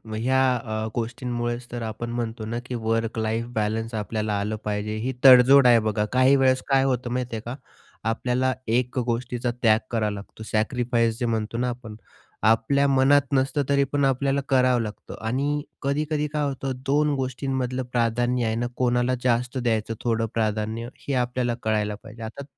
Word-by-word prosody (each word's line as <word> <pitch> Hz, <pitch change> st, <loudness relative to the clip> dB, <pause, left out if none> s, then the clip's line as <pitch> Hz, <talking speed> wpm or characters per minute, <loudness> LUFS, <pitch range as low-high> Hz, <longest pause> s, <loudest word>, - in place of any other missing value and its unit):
ह्या 130 Hz, +4 st, +1 dB, 0.2 s
अ, 110 Hz, -2 st, -3 dB
गोष्टींमुळेच 120 Hz, +1 st, -3 dB
तर 120 Hz, 0 st, -4 dB
आपण 110 Hz, +1 st, -5 dB
म्हणतो 115 Hz, -2 st, -4 dB
ना, 115 Hz, +2 st, -3 dB
की 130 Hz, -, -5 dB
वर्क 115 Hz, 0 st, -1 dB
लाईफ 110 Hz, +1 st, -1 dB
बॅलन्स 110 Hz, +2 st, -1 dB
आपल्याला 110 Hz, 0 st, -2 dB
आलं 105 Hz, +2 st, -2 dB
पाहिजे. 105 Hz, 0 st, -2 dB
ही 125 Hz, +4 st, -2 dB
तडजोड 130 Hz, +1 st, +8 dB
आहे 120 Hz, -1 st, +7 dB
बघा. 110 Hz, -1 st, 0 dB
काही 130 Hz, +2 st, +5 dB
वेळेस 130 Hz, -1 st, +3 dB
काय 135 Hz, -1 st, +3 dB
होतं, 125 Hz, -2 st, 0 dB
माहिती 125 Hz, -2 st, -2 dB
आहे 110 Hz, -, -4 dB
का, 120 Hz, +2 st, -4 dB, 0.5 s
आपल्याला 125 Hz, +3 st, 0 dB
1 125 Hz, +3 st, 0 dB
अ, -, -, +1 dB
गोष्टीचा 120 Hz, 0 st, -2 dB
त्याग 110 Hz, -2 st, +5 dB
करावा 110 Hz, -3 st, 0 dB
लागतो, 100 Hz, +2 st, -9 dB
सॅक्रिफाईस 115 Hz, +1 st, +1 dB
जे 125 Hz, -, 0 dB
म्हणतो 115 Hz, -1 st, -2 dB
ना, 125 Hz, +1 st, 0 dB
आपण. 120 Hz, -3 st, -7 dB, 0.5 s
आपल्या 115 Hz, +6 st, +3 dB
मनात 135 Hz, +1 st, +5 dB
नसतं, 135 Hz, +1 st, +1 dB
तरी 140 Hz, 0 st, +4 dB
पण 145 Hz, -1 st, +2 dB
आपल्याला 135 Hz, +1 st, +1 dB
करावं 130 Hz, -2 st, +3 dB
लागतं. 110 Hz, -1 st, -7 dB
आणि 145 Hz, +5 st, 0 dB, 0.2 s
कधी-कधी 150 Hz, +2 st, 0 dB
काय 150 Hz, -1 st, 0 dB
होतं, 135 Hz, 0 st, -3 dB
2 145 Hz, +2 st, +2 dB
गोष्टींमधलं 130 Hz, -1 st, -2 dB
प्राधान्य 120 Hz, +1 st, +1 dB
आहे 110 Hz, 0 st, 0 dB
ना, 120 Hz, +1 st, -1 dB
कोणाला 125 Hz, 0 st, +1 dB
जास्त 125 Hz, +1 st, +1 dB
द्यायचं, 115 Hz, -3 st, 0 dB
थोडं 115 Hz, -1 st, 0 dB
प्राधान्य 110 Hz, +1 st, -1 dB, 0.2 s
हे 140 Hz, -, -1 dB
आपल्याला 125 Hz, -1 st, -1 dB
कळायला 105 Hz, -1 st, 0 dB
पाहिजे. 110 Hz, 0 st, -12 dB
आता 110 Hz, +5 st, -7 dB
120 Hz, 170 wpm, -24 LUFS, 110-130 Hz, 0.5 s, तडजोड